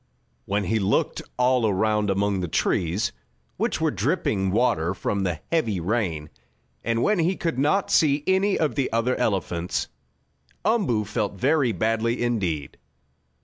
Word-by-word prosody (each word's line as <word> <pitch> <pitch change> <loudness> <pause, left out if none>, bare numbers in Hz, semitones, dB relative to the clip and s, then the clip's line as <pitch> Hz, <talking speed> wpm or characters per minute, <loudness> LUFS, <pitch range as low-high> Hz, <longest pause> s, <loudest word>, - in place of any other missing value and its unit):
When 100 +1 0
he 110 +4 0
looked 100 +1 0 0.2
all 125 -2 +3
around 105 +1 +1
among 100 0 +1
the 90 - -2
trees, 85 +4 0 0.5
which - - -1
were - - +1
dripping 95 -2 0
water 90 -5 +1
from 100 +1 -2
the 90 -5 -2
heavy 115 - +1
rain, 85 -6 -2 0.5
and 115 +1 0
when 210 -2 +2
he 175 +3 +2
could 165 -7 -2
not 150 +8 +1
see 145 -2 +3
any 190 +1 +2
of 155 -2 0
the 135 -3 -1
other 115 +3 +1
elephants, 90 -6 -1 0.8
Umboo 195 - +1
felt 105 -1 -2
very 130 +4 +2
badly 115 +4 0
indeed. 95 -12 -2
110 Hz, 145 wpm, -24 LUFS, 95-130 Hz, 0.8 s, all